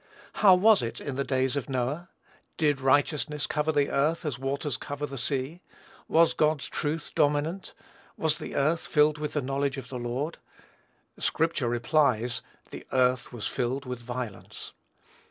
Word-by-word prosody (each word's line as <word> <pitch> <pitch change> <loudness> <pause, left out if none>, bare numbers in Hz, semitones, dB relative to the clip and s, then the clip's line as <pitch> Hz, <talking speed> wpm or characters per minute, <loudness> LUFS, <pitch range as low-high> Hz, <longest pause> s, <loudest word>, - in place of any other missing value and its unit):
How 195 -3 +8
was 210 +3 +5
it 115 - -4
in 140 - -5
the 140 - 0
days 130 -1 0
of 140 -2 -3
Noah? 135 +7 -2 0.5
Did 145 -4 +2
righteousness 145 +2 +2
cover 150 +1 0
the 145 -2 +1
earth, 155 +5 +1
as 145 -5 -2
the - - -17
waters 140 0 -2
cover 145 +2 -4
the 140 -1 -7
sea? 135 +6 -2 0.5
Was 165 +1 +4
God's 155 -2 +1
truth 150 +1 -3
dominant? 150 +6 0 0.4
Was 155 -1 +1
the - - -6
earth 155 +4 +1
filled 150 0 +3
with 150 -1 -3
the 150 - -1
knowledge 140 +1 -1
of 130 -2 -7
the 125 - -5
Lord? 125 +7 -3 0.8
Scripture 160 -6 +1
replies, 120 -2 +1 0.3
"the - - -8
earth 125 -1 +2
was 120 -3 -6
filled 130 +2 -2
with 125 -1 -5
violence." 120 -3 -6
140 Hz, 160 wpm, -28 LUFS, 130-155 Hz, 0.8 s, How